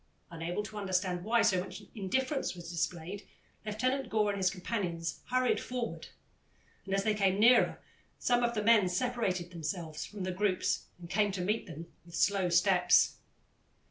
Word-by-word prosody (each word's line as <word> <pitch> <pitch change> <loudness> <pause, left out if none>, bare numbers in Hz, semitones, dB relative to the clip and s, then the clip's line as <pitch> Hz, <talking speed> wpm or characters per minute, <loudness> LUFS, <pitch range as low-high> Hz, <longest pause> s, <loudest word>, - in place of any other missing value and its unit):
Unable 170 +4 -3
to 210 0 -7
understand 185 -2 -1
why 230 +3 +3
so 185 - +3
much 185 - -7
indifference 260 +5 -1
was 170 -1 -8
displayed, 175 +3 -3 0.4
Lieutenant 255 +5 -1
Gore 210 -2 +2
and 200 - -4
his 190 -2 +2
companions 180 -4 -3
hurried 255 0 +2
forward, 250 -2 -4 0.8
and, 195 0 -1
as 195 - +1
they 215 - +2
came 195 -2 +1
nearer, 240 +3 +5 0.4
some 245 0 +2
of 235 0 +1
the 210 - 0
men 210 -4 +5
separated 185 -4 -1
themselves 160 -1 -4
from 205 -2 -7
the 185 - -2
groups 185 0 0
and 175 -1 -10
came 205 +3 +1
to 185 - -3
meet 210 +5 -1
them 165 -1 -8 0.2
with 170 0 -11
slow 195 0 +2
steps. 180 0 +4
195 Hz, 165 wpm, -31 LUFS, 180-215 Hz, 0.8 s, nearer